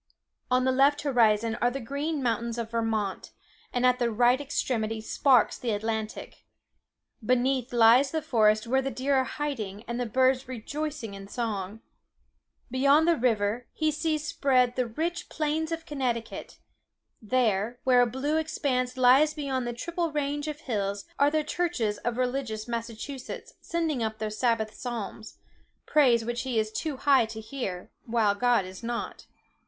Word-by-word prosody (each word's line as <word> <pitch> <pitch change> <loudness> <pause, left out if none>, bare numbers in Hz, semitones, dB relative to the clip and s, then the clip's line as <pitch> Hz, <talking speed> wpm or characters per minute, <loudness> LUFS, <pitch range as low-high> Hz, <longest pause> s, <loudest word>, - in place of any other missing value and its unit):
On 255 0 +3
the 260 - +3
left 280 +3 +3
horizon, 230 -5 +2
are 245 - +4
the 270 +2 -4
green 280 +4 -3
mountains 235 0 -1
of 230 -1 -4
Vermont; 225 -4 -1 0.4
and 245 0 0
at 250 0 +4
the 240 -1 +1
right 245 +4 +3
extremity 225 -6 -2
sparkles 245 +2 +3
the 245 - -3
Atlantic. 220 +1 -4 0.8
Beneath 255 +2 +1
lies 240 +3 +6
the 315 +1 -2
forest 215 -6 +3
where 265 +3 +2
the 270 - -2
deer 270 +1 -1
are 265 -1 +4
hiding, 225 -10 -4
and 235 +1 -3
the 245 - -1
birds 260 +3 +2
rejoicing 265 -1 -5
in 195 0 -9
song. 215 -2 -4 0.9
Beyond 280 +5 +4
the 340 - +5
river, 230 -2 0
he 310 -1 +1
sees 310 0 -1
spread 255 -4 +2
the 250 -2 0
rich 330 +9 -3
plains 315 +1 -1
of 330 0 -4
Connecticut; 250 -7 -3 0.6
there, 225 0 0
where 250 -1 +5
a 245 - +4
blue 275 +6 -1
expanse 260 -5 -1
lies 265 +5 +5
beyond 265 -4 -2
the - - -1
triple 335 +6 -3
range 290 0 -2
of 300 0 -5
hills, 200 -5 -2
are 285 - +5
the 310 0 0
churches 300 -11 -1
of 240 0 -3
religious 250 -4 -2
Massachusetts 235 +3 -6
sending 325 -6 -1
up 220 -1 -2
their 215 -1 -3
sabbath 220 -1 0
psalms—praise 235 +2 -1
which 240 +1 -2
he 255 -3 -2
is 215 0 0
too 295 +4 -3
high 270 -4 +4
to 220 0 -7
hear, 220 -6 -5 0.2
while 225 -3 +2
God 240 -1 +2
is 185 0 -9
not. 235 0 -5
245 Hz, 160 wpm, -27 LUFS, 225-280 Hz, 0.9 s, lies